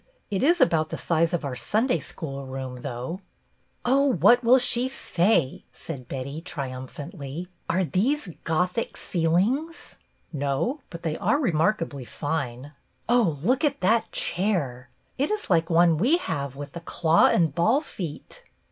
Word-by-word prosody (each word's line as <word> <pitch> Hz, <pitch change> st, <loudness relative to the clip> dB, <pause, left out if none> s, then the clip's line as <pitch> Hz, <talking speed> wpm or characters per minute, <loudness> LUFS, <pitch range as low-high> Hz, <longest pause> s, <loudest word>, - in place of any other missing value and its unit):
It 195 Hz, -, 0 dB
is 340 Hz, +5 st, +4 dB
about 160 Hz, -, +3 dB
the -, -, -4 dB
size 165 Hz, 0 st, +1 dB
of 175 Hz, -4 st, -1 dB
our 135 Hz, -2 st, -3 dB
Sunday 215 Hz, -, +1 dB
School 140 Hz, -5 st, -7 dB
room, 130 Hz, -1 st, -6 dB
though." 130 Hz, +8 st, -5 dB, 0.3 s
" -, -, -42 dB, 0.3 s
Oh, 275 Hz, +3 st, +4 dB
what 235 Hz, -, +5 dB
will 245 Hz, +3 st, +6 dB
she 245 Hz, 0 st, +1 dB
say! 175 Hz, -, +1 dB
" -, -, -42 dB
said 135 Hz, -7 st, -8 dB
Betty, 140 Hz, +3 st, -5 dB
tri 140 Hz, -6 st, -4 dB
umphantly. 140 Hz, +5 st, -7 dB, 0.2 s
"Are 185 Hz, +3 st, +2 dB
these 220 Hz, -, 0 dB
Gothic 180 Hz, +7 st, -1 dB
ceilings.?" 200 Hz, -, -1 dB, 0.2 s
" -, -, -41 dB
No, 145 Hz, -, -1 dB
but 170 Hz, -1 st, -9 dB
they 160 Hz, -1 st, -2 dB
are 285 Hz, -, +2 dB
remarkably 165 Hz, -, 0 dB
fine." 140 Hz, -1 st, -4 dB, 0.4 s
"Oh, 225 Hz, -11 st, +3 dB
look 255 Hz, -, +2 dB
at 285 Hz, -2 st, +1 dB
that 220 Hz, +5 st, +2 dB
chair! 145 Hz, -11 st, 0 dB, 0.3 s
It 280 Hz, -, +1 dB
is 425 Hz, -, -3 dB
like 165 Hz, -1 st, +3 dB
one 165 Hz, -2 st, +4 dB
we 265 Hz, -, +4 dB
have 140 Hz, -, -4 dB
with 145 Hz, 0 st, -8 dB
the 170 Hz, -, -6 dB
claw 165 Hz, -1 st, +3 dB
and 165 Hz, -5 st, +2 dB
ball 220 Hz, -, +3 dB
feet." 175 Hz, -, -7 dB
170 Hz, 160 wpm, -25 LUFS, 140-230 Hz, 0.4 s, will